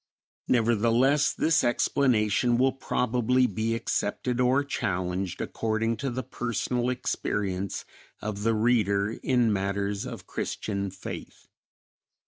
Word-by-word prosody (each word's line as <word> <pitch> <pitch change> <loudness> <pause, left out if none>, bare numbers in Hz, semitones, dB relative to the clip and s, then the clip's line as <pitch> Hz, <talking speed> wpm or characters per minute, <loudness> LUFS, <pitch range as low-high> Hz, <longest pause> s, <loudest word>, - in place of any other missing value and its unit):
Nevertheless, 120 +4 +3
this 160 0 +2
explanation 120 -2 +2
will 130 +2 +4
probably 125 -1 +1
be 110 +1 -1
accepted 120 +2 -1
or 130 +3 +3
challenged 95 -8 -2
according 115 +1 -1
to 135 +5 -2
the 130 +1 -3
personal 120 +1 -2
experience 100 -6 -2 0.3
of 105 -1 -4
the 115 +1 +2
reader 105 -3 +2
in 120 -4 +2
matters 100 +1 -1
of - - -8
Christian 100 -2 -3
faith. 95 0 -8
115 Hz, 110 wpm, -27 LUFS, 100-125 Hz, 0.3 s, will